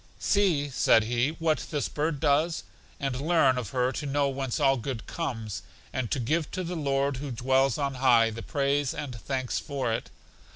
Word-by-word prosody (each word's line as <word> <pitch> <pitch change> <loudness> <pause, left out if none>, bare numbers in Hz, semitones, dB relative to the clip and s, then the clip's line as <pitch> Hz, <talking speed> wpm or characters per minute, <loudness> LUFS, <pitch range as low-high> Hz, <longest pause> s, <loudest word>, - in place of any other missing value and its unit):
See, 180 -8 +2
said 115 -4 +4
he, 120 +4 +1
what 160 -1 0
this 145 -3 -1
bird 150 -1 -2
does, 155 +3 +2 0.4
and 135 -2 -2
learn 145 -5 +3
of 115 -6 -5
her 125 +2 +1
to 150 +2 -4
know 140 0 +1
whence 135 -1 -2
all 135 -2 +4
good 125 -1 -4
comes, 115 - -4 0.3
and 130 -4 -2
to 135 - 0
give 155 +7 0
to 185 - -1
the 175 +1 -4
Lord 140 -3 0
who 140 +2 -5
dwells 130 +1 +2
on 140 -2 -1
high, 120 -3 +4
the 115 +1 -6
praise 140 +3 0
and 145 -4 -5
thanks 130 +2 -2
for 135 -5 -2
it. - - -3
135 Hz, 190 wpm, -28 LUFS, 125-145 Hz, 0.4 s, said